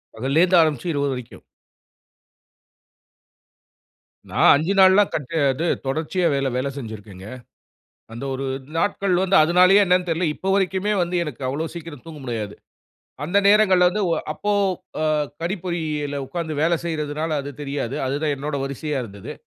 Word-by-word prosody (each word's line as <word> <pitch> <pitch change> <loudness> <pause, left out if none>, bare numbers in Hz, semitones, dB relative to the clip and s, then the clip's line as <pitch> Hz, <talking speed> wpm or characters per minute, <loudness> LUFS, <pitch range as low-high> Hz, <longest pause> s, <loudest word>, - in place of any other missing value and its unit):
பகல்லேருந்து 160 +9 +3
ஆரம்பிச்சு 155 +1 0
இரவு 145 -1 0
வரைக்கும். 125 -2 -9 2.9
நான் - - +4
5 160 +7 0
நாள்லாம் 190 +2 +6
கட் 150 +1 -4 0.2
அது 135 +6 -3 0.2
தொடர்ச்சியா 160 +5 0
வேல, 135 -1 0
வேல 130 +2 -1
செஞ்சுருக்கேங்க. 105 -6 -9 0.9
அந்த 120 +4 -7
ஒரு 135 +1 -4 0.3
நாட்கள் 200 0 +1
வந்து, 195 +1 +2
அதுனாலயே 180 +5 +5
என்னான்னு 180 0 +2
தெர்ல, 165 +2 0
இப்போ 190 - -4
வரைக்குமே 190 +1 0
வந்து 175 +1 -2
எனக்கு 145 -5 -8
அவ்ளோ 155 +4 -2
சீக்கிரம் 165 -5 -9
தூங்க 160 -2 -10
முடியாது. 110 -4 -4 0.7
அந்த 180 +6 +2
நேரங்கள்ல 190 -4 +5
வந்து, 210 +3 -2
ஒ - - +3 0.2
அப்போ 210 - -2 0.5
அ - - +1 0.4
கணிப்பொறியில 160 -6 -3
உக்காந்து 160 +3 -4
வேல 170 +1 +3
செய்யுறதுனால 155 -1 -3
அது 140 - -6
தெரியாது, 140 -2 -3
அதுதான் 145 +2 -1
என்னோட 145 +1 -4
வரிசையா 140 +1 -3
இருந்தது. 100 -3 -9
155 Hz, 135 wpm, -22 LUFS, 140-180 Hz, 2.9 s, நாள்லாம்